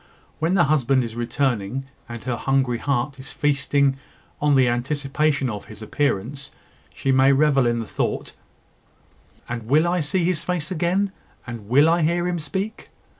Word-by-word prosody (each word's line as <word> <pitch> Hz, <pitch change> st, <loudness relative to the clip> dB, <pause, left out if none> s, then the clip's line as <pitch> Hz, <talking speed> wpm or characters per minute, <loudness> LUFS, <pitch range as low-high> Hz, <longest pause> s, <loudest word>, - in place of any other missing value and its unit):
When 165 Hz, +4 st, +1 dB
the 175 Hz, -, +5 dB
husband 135 Hz, -3 st, +2 dB
is 115 Hz, -1 st, -6 dB
returning, 120 Hz, 0 st, -1 dB, 0.2 s
and 120 Hz, -1 st, -7 dB
her 125 Hz, 0 st, -2 dB
hungry 130 Hz, -1 st, 0 dB
heart 135 Hz, 0 st, -1 dB
is 130 Hz, -, -9 dB
feasting 140 Hz, -1 st, +1 dB, 0.4 s
on 145 Hz, -1 st, +3 dB
the 130 Hz, -2 st, +5 dB
anticipation 140 Hz, +3 st, 0 dB
of 105 Hz, -4 st, -5 dB
his 110 Hz, 0 st, -11 dB
appearance, 140 Hz, +2 st, -2 dB, 0.4 s
she 135 Hz, -, -1 dB
may 130 Hz, +1 st, +5 dB
revel 135 Hz, -2 st, +3 dB
in 120 Hz, 0 st, +1 dB
the 115 Hz, -, -3 dB
thought -, -, -3 dB, 1.1 s
"And 115 Hz, -2 st, -5 dB
will 155 Hz, +6 st, +4 dB
I 180 Hz, +1 st, +1 dB
see 170 Hz, +4 st, 0 dB
his 170 Hz, -2 st, 0 dB
face 175 Hz, -3 st, -2 dB
again, 185 Hz, +3 st, 0 dB, 0.3 s
And 115 Hz, -4 st, -8 dB
will 140 Hz, +5 st, +5 dB
I 170 Hz, +1 st, +3 dB
hear 170 Hz, +3 st, +1 dB
him 175 Hz, -1 st, -1 dB
speak?" 190 Hz, +8 st, -5 dB
140 Hz, 165 wpm, -23 LUFS, 120-155 Hz, 1.1 s, the